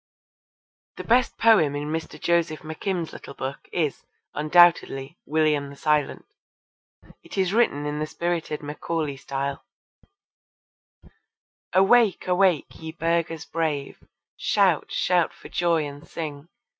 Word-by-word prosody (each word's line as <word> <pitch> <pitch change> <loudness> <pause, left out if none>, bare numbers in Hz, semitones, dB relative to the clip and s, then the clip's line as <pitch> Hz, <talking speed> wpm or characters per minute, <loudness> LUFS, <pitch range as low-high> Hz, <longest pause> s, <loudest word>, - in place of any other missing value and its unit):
The - - -6
best 245 +1 +2
poem 185 -11 +4
in 145 +1 -3
Mr. 160 0 -4
Joseph 165 -3 +1
McKim's 165 +2 -4
little 140 - -10
book 135 +1 -6
is, 155 -5 -1 0.3
undoubtedly, 155 -2 +3
William 150 -2 +1
the 140 - -11
Silent. 150 0 0 1.0
It - - -11
is 190 0 +1
written 215 -11 +2
in 150 0 -3
the 155 - -2
spirited 165 -2 -3
Macaulay 150 0 -3
style: 140 +1 -4 2.1
Awake, 200 +2 +4
awake, 180 -3 +2
ye 160 0 -6
burghers 165 -1 -1
brave! 155 -4 -3 0.3
shout, - - +2
shout 175 -2 +1
for - - -13
joy 170 -3 +1
and 145 +2 -9
sing! 150 -2 -6
160 Hz, 120 wpm, -25 LUFS, 145-175 Hz, 2.1 s, poem